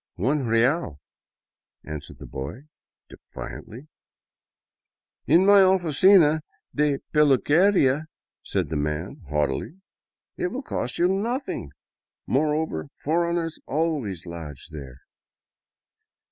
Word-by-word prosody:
" - - -67
One 140 -3 0
real," 115 - +1 0.9
answered 75 -2 -8
the - - -10
boy, 70 - -6 0.5
defiantly. 125 +8 -10 0.7
*' - - -65
In 180 +3 +6
my 200 0 +7
oUcina 180 -3 +5 0.3
de 150 -1 +2 0.2
peluqueria," 150 +1 +4 0.4
said - - -2
the 80 - -2
man, 75 +5 -3
haughtily, 75 - -1 0.3
" - - -62
it 360 - +1
will 265 -5 -5
cost 125 - -4
you 175 - +3
nothing. 220 - -2 0.6
Moreover, 155 +3 0 0.2
foreigners 170 +1 0
always 140 - -2
lodge 80 -4 -8
there." 70 -4 -10
150 Hz, 105 wpm, -25 LUFS, -, 0.9 s, my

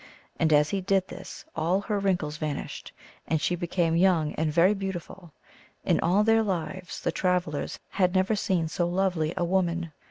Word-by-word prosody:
And 160 -1 +2
as 150 0 +4
he 195 - -1
did 190 0 +1
this 190 - -9
all 170 +5 +1
her 205 0 -1
wrinkles 175 -6 0
vanished, 150 -2 -5 0.4
and 160 - +1
she 175 - 0
be 175 0 -4
came 165 -2 +1
young 170 -4 +3
and 155 -1 -1
very 175 +6 +4
beautiful; 190 -3 -6 0.5
in - - +2
all 190 +5 +3
their 225 +1 +4
lives 180 -2 -3
the - - 0
travelers 180 -5 -1
had 180 -1 +1
never 190 +3 +2
seen 185 -6 0
so 170 +2 -1
lovely 175 -3 0
a - - +1
woman. 170 -2 0
180 Hz, 180 wpm, -27 LUFS, 160-190 Hz, 0.5 s, as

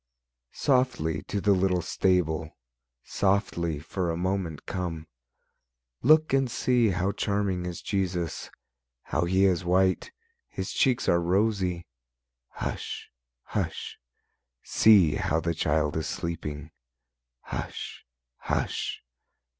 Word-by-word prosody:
Softly 125 - +1
to 100 - -1
the 100 +1 +2
little 90 -2 +1
stable, 85 -4 0 0.5
Softly 95 -5 0
for 85 +4 -3
a 80 - -1
moment 90 -3 -2
come; 85 -4 -4 1.0
Look 155 +2 +5
and 135 -2 +3
see 120 0 +2
how 95 +1 0
charming 100 -3 -1
is 85 -1 -6
Jesus, 90 -5 -2 0.5
How - - 0
He 95 +2 +3
is 95 -2 +2
white, 95 +1 +2 0.4
His - - -4
cheeks 130 -3 +2
are 85 0 +4
rosy. 95 -1 +1 0.6
Hush! - - -5 0.3
Hush! - - -4 0.6
see 100 -8 +5
how 80 - +1
the 85 +1 -1
Child 75 -1 0
is 80 -2 -1
sleeping; 75 -4 -4 0.7
Hush! - - -6 0.3
Hush! - - -2
90 Hz, 105 wpm, -27 LUFS, 85-100 Hz, 1.0 s, Look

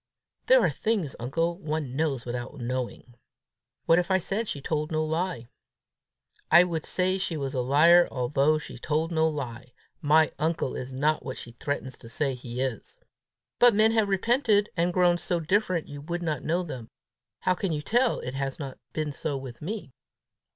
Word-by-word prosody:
"There - - +7
are - - +3
things, 205 -11 -1
uncle, 165 +8 -1
one 155 -6 -3
knows 140 -5 -1
without 120 +3 -5
knowing!" 125 0 -4 0.7
"What 165 +1 +5
if 180 - -2
I 190 - +4
said 200 +5 -2
she 145 - -3
told 150 +1 -2
no 155 0 0
lie?" 160 -5 -2 1.0
"I 170 +3 +8
should 165 -3 -3
say 185 +1 +1
she 170 -4 -2
was 135 -2 -3
a 130 - 0
liar 165 +7 +6
although 140 +4 +2
she 155 - -8
told 155 +5 -1
no 160 -1 +3
lie. 125 -5 -6 0.3
My 155 +1 +4
uncle 160 -3 -1
is 130 +1 -5
not 150 +4 +1
what 130 - -5
she 120 - -8
threatens 130 +1 -4
to 115 - -11
say 140 +2 -1
he 125 0 -6
is!" 135 - -4 0.6
"But 240 -3 +6
men 215 +1 +5
have 220 -3 +2
repented, 210 +1 +2
and 175 0 +1
grown 175 -1 +3
so 175 0 -1
different 185 0 0
you 145 0 -8
would 175 +3 -4
not 155 -5 -2
know 175 +3 0
them: 130 -9 -7 0.5
how 185 - +2
can 180 0 -2
you 150 -1 -2
tell 245 +5 +2
it 125 - -5
has 135 0 -3
not 135 -4 -7
been 155 -1 -2
so 140 +1 -3
with 130 -3 -9
me? 195 -2 -5
155 Hz, 185 wpm, -27 LUFS, 135-180 Hz, 1.0 s, I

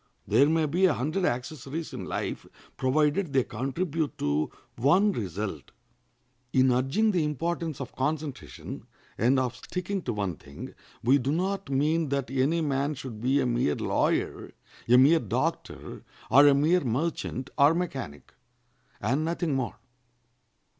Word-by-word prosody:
There 140 +2 +4
may 160 0 +2
be 175 +6 +3
a - - +1
hundred 155 +9 -1
accessories 140 +4 -3
in - - -5
life, - - -4 0.3
provided 150 +5 +1
they 130 -2 +4
contribute 150 +4 -3
to 75 +1 0 0.3
one 180 - +4
result. 100 - -4 0.8
In 130 0 +4
urging 135 - +2
the 175 -5 +1
importance 160 0 -2
of - - -7
concentration, 150 +1 -4 0.3
and 125 +5 +3
of 125 -1 -1
sticking 185 +7 -4
to 120 - -3
one 100 -6 -2
thing, 70 0 -10 0.3
we 130 +5 +5
do 135 +2 -1
not 190 +3 -1
mean 150 +3 +1
that 140 -1 -2
any 140 +6 +1
man 145 0 0
should 125 -5 -8
be 130 +4 +2
a - - 0
mere 120 -12 +1
lawyer, - - 0 0.4
a 125 - +7
mere 145 +6 +6
doctor, 110 - -3 0.3
or 140 +2 +8
a 140 - +6
mere 160 +6 +3
merchant 130 0 -2
or 145 +3 +5
mechanic, 135 - -5 0.7
and 135 +9 0
nothing 165 -1 -1
more. 130 -3 -2
140 Hz, 145 wpm, -27 LUFS, 125-165 Hz, 0.8 s, or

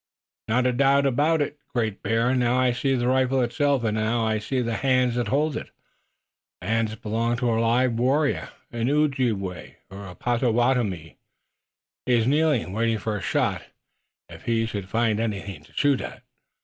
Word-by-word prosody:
"Not 125 +3 +1
a 125 - +3
doubt 140 +2 +3
of 135 -2 +1 0.2
it, 145 +1 -3
Great 110 -4 -2
Bear. 115 +3 +1
Now, 125 -1 +2
I 130 -1 +3
see 135 +2 0
the 120 -1 0
rifle 130 +1 +2
itself! 130 +2 +1
And 110 -1 0
now 110 +1 0
I 110 -1 0
see 130 +5 -2
the 115 -2 -1
hands 130 -2 +2
that 120 -2 -1
hold 145 +5 +1
it. - - -5 0.9
The 90 - -8
hands 110 -1 0
belong 115 +2 -1
to 120 -1 0
a 115 0 +1
live 120 +2 +2
warrior, 140 +4 +1 0.2
an 120 0 -1
Ojibway, 125 - -1 0.2
or 100 +1 -8
a 90 - -10
Pottowattomie. 120 - 0 0.9
He 125 - +3
is 115 -2 +2
kneeling, 145 - +1
waiting 115 +1 +1
for 110 0 -3
a 105 - -4
shot, - - -1 0.6
if - - -13
he 115 -1 +1
should 100 -4 -5
find 115 -1 +1
anything 100 -3 -4
to - - -22
shoot 145 -2 +2
at." - - -8
120 Hz, 175 wpm, -24 LUFS, 110-130 Hz, 0.9 s, a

